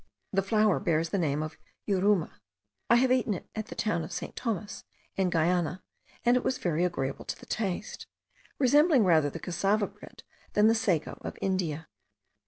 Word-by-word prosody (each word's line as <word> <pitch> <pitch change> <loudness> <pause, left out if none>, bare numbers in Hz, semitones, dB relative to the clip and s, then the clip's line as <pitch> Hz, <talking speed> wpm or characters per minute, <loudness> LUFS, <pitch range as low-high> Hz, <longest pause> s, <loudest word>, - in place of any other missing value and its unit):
The 195 - +3
flour 210 0 +2
bears 165 -3 0
the 195 - -1
name 150 -2 0
of 155 0 -7 0.3
yuruma: 195 -3 +2 0.6
I 235 - +7
have 250 +1 +3
eaten 245 -5 +2
it - - -9
at 220 -1 -4
the - - -8
town 170 -7 0
of 160 - -8
St. 175 - -5
Thomas, 215 -4 -4 0.3
in 190 -2 +1
Guiana, 175 +1 +1 0.4
and 240 +1 +5
it 250 - +1
was 260 - 0
very 170 -1 0
agreeable 140 -7 -2
to - - -5
the - - -13
taste, 210 0 -3 0.5
resembling 290 0 +5
rather 160 -6 +4
the 165 - -7
cassava 195 +5 +1
bread - - -13 0.3
than 210 - +4
the 225 - +6
sago 195 -9 0
of - - -6
India. 170 -5 -2
190 Hz, 180 wpm, -29 LUFS, 165-215 Hz, 0.6 s, I